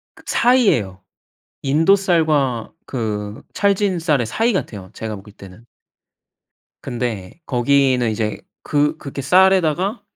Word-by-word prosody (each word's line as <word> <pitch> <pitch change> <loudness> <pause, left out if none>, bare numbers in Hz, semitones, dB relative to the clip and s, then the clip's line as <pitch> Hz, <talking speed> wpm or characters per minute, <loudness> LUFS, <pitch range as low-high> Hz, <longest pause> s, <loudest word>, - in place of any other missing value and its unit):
그 - - -18
사이예요. 195 - +2 0.6
인도 155 +8 +4
쌀과 155 - +1
그 105 -4 -4
찰진 200 -2 +1
쌀의 150 -8 +1
사이 225 - 0
같아요 100 - -4
제가 110 -1 -5
먹을 100 +1 -13
때는. 100 +2 -14 1.2
근데 115 - -5
거기는 130 -1 +2
이제 110 0 -2 0.2
그 145 0 +1
그렇게 140 0 -7
쌀에다가 185 - +3
140 Hz, 235 characters per minute, -19 LUFS, 110-180 Hz, 1.2 s, 인도